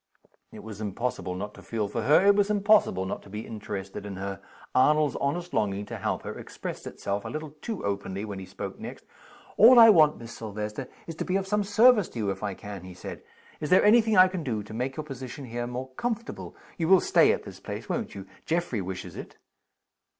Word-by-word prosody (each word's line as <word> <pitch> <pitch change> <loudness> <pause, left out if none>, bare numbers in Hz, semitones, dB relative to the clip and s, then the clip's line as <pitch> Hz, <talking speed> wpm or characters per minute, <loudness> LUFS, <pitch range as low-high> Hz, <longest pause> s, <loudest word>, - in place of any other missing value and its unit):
It - - -11
was 110 -1 -8
impossible 100 -3 -3
not 105 +3 -5
to - - -13
feel 110 -3 -2
for 115 - -3
her 150 - +5
it 200 0 +6
was 205 0 +2
impossible 205 - +3
not 95 - -4
to - - -16
be 105 +2 -6
interested 100 -3 -6
in 100 -1 -6
her. 100 +1 -5 0.3
Arnold's 150 +3 +4
honest 175 +6 -2
longing 100 -1 0
to - - -6
help - - -2
her - - -6
expressed - - -7
itself 100 0 -3
a - - -6
little 155 -1 -5
too 225 - -4
openly 100 0 -3
when 100 -2 -6
he 95 - -8
spoke 95 - -7
next. - - -8 0.5
"All 240 +4 +9
I 225 -1 +10
want, 155 -5 +5
Miss 115 0 -10
Silvester, 105 +3 -5 0.2
is 165 - -6
to - - -2
be 180 - -1
of 195 0 0
some 210 +1 +1
service 215 0 +5
to - - -10
you, 105 -3 0
if 95 - -6
I 100 -2 -3
can," 100 -3 -8
he 90 -1 -10
said. - - -8 0.4
"Is 150 - -4
there 185 - +5
any 225 +3 +7
thing 220 -2 +1
I 185 0 +9
can 185 -3 -4
do 110 -7 -2
to 105 - -11
make 130 +5 -3
your 155 - -3
position 135 -1 -7
here 120 0 -4
more 125 +2 -5
comfortable? 230 - -4 0.2
You 165 - +1
will 190 +1 +7
stay - - +4
at - - -2
this - - -10
place, - - -7
won't - - -3
you? 95 -1 -7 0.2
Geoffrey 165 - 0
wishes 95 -1 -6
it." - - -9
125 Hz, 225 wpm, -27 LUFS, -, 0.5 s, I